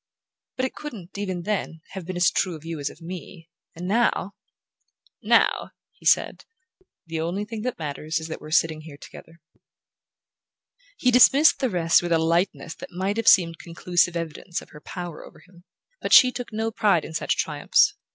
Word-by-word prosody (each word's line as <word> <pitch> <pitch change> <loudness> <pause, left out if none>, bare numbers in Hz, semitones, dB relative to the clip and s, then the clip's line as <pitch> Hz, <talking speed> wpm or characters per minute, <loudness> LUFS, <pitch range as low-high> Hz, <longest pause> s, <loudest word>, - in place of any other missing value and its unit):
But 260 - 0
it 260 - -4
couldn't, 220 - -9
even 185 -4 -3
then, 180 -5 -3
have 190 -3 -7
been 185 - -4
as 175 0 +3
true 180 -3 -1
of 155 0 -12
you 165 -2 -5
as 145 - -2
of 165 - -15
me; 170 -1 -9 0.2
and 175 +2 -6
now 205 -2 +1 0.4
" - - -41 0.2
"Now," - - -1 0.2
he - - -7
said, - - +2 0.6
"the 165 -1 -4
only 180 +5 -2
thing 220 0 -6
that 250 +2 -3
matters 155 +1 -4
is 160 0 -4
that 160 - -7
we're 155 - -10
sitting 160 0 +1
here 155 -2 -12
together." 165 +3 -14 1.6
He 250 - +2
dismissed 275 +5 +6
the 260 -2 0
rest 170 -4 +3
with 175 0 -4
a - - +4
lightness 165 +1 0
that - - -10
might 190 +4 -2
have 230 - -2
seemed 165 -3 +5
conclusive 175 0 0
evidence 170 +2 -4
of - - -15
her 150 - -13
power 175 -2 -7
over - - -15
him. 175 +1 -21 0.4
But - - -1
she 255 -2 +8
took 245 -1 -7
no 220 +1 -2
pride 200 -7 +2
in - - -9
such 155 - -1
triumphs. - - +2
175 Hz, 190 wpm, -24 LUFS, 165-205 Hz, 1.6 s, she